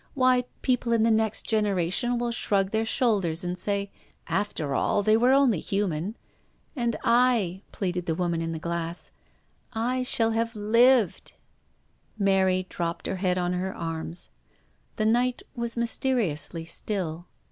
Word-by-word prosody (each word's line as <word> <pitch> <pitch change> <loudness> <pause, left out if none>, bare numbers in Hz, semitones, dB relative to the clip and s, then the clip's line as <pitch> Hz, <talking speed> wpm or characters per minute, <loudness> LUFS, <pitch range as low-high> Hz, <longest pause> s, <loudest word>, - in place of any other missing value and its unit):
Why, 255 -2 +3 0.2
people 250 -2 +1
in 225 -1 +3
the 230 - +4
next 220 -1 +1
generation 210 +2 +1
will 240 0 -1
shrug 195 -4 0
their 220 0 0
shoulders 200 -8 +1
and 180 0 -2
say, 200 +2 -2 0.2
* - - -38
After 155 -8 -1
all, 205 - +1
they 215 +1 +4
were 245 +3 +4
only 265 - +4
human.' 195 0 -2 0.6
And 235 -4 0
I," 230 -6 +3
pleaded 180 -2 -3
the 160 - 0
woman 170 -1 -1
in 165 0 -2
the 165 - -3
glass, 170 +1 -3 0.4
" - - -33 0.2
I 255 0 0
shall 230 -2 +2
have 230 +1 -1
lived." 230 0 +3 0.8
Mary 190 -2 +2
dropped 170 -2 -4
her 190 - -2
head 180 -1 0
on 180 0 0
to 180 - -1
her 190 +1 -3
arms, 160 - -3 0.6
The 215 - 0
night 245 +3 +1
was 235 -1 -2
mysteriously 210 - -1
still. 175 -1 -3
205 Hz, 155 wpm, -26 LUFS, 175-235 Hz, 0.8 s, the